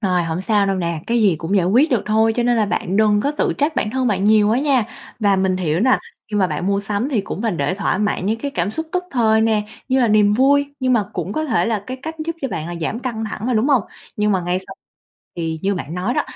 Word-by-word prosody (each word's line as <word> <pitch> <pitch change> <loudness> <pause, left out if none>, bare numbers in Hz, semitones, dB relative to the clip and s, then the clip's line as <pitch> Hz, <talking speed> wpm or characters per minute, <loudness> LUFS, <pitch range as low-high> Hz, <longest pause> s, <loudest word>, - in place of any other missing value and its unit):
Rồi, 180 -4 +1
hổng 165 +1 -3
sao 205 0 +2
đâu 195 - 0
nè. 170 -3 -2
Cái 235 0 +1
gì 190 -6 +3
cũng 170 +6 -1
giải 180 -2 +2
quyết 255 - +3
được 245 -5 +1
thôi 220 +1 +3
cho 240 - +2
nên 240 0 +2
là 215 -2 +2
bạn 190 -1 -2
đừng 210 -1 +3
có 285 - 0
tự 295 - 0
trách 295 +3 +1
bản 210 - 0
thân 260 +1 -1
bạn 200 -3 0
nhiều 210 -1 +4
quá 230 - +2
nha! 270 -4 +2 0.4
Và 200 -2 +3
mình 190 -1 +1
hiểu 170 -1 -1
nè, 260 +2 +4 0.3
khi 210 - -1
mà 190 - +3
bạn 180 - -3
mua 200 0 +1
sắm 205 +5 -2
thì 250 -8 +1
cũng 195 - -6
mình 220 -6 -1
để 145 +6 0
thỏa 200 -1 -1
mãn 205 -3 -1
những 220 +2 0
cái 285 - -3
cảm 180 -5 -1
xúc 320 +8 -4
tức 365 0 -1
thời 220 -4 +3
nè, 220 -1 +2 0.3
như 260 0 +2
là 240 - +3
niềm 210 -1 +4
vui, 285 +3 +2
nhưng 255 0 +2
mà 220 -4 +2
cũng 195 - -4
có 310 - -1
thể 245 -6 +1
là 220 -4 -1
cái 255 - -5
cách 320 +2 -5
giúp 330 0 -4
cho 270 - -1
bạn 160 -5 -4
là 175 - -5
giảm 190 +8 -2
căng 235 -4 -4
thẳng 215 +1 -5
mà, 250 - +1
đúng 225 +7 +2
hông? 265 -6 +4 0.3
Nhưng 210 0 +1
mà 190 - +1
ngay 175 +1 -1
sau - - -9 0.6
thì 160 -1 -3
như 200 +1 +1
bạn 165 -2 -5
nói 185 +7 -1
đó, - - +2
215 Hz, 290 wpm, -20 LUFS, 190-245 Hz, 0.6 s, nhiều